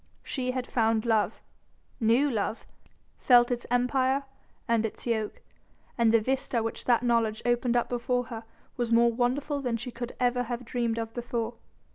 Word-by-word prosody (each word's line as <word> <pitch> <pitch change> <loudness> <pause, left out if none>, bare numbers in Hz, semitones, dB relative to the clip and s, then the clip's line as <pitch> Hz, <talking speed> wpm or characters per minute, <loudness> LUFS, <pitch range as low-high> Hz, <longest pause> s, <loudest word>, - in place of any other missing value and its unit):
She 255 -2 -3
had 255 -1 -2
found 225 -2 +1
love, 220 -3 +1 0.6
knew 235 +5 +4
love, 220 0 -2 0.5
felt 245 -1 +5
its 240 -1 -2
empire 260 +2 +2 0.4
and 230 -2 +2
its 225 - -5
yoke, 220 -3 -2 0.5
and 230 -2 +3
the 230 - +5
vista 250 0 -1
which 225 - -4
that 240 -1 +3
knowledge 230 -3 +1
opened 240 0 +2
up 240 - +1
before 245 +1 0
her 230 -1 -7 0.3
was 240 -2 -1
more 235 0 +5
wonderful 275 +4 0
than 245 -3 -1
she 245 +2 -6
could 240 0 -6
ever 245 0 +2
have 240 +1 -4
dreamed 235 -1 -1
of 225 -1 -4
before. 235 -1 -3
240 Hz, 165 wpm, -28 LUFS, 230-250 Hz, 0.6 s, felt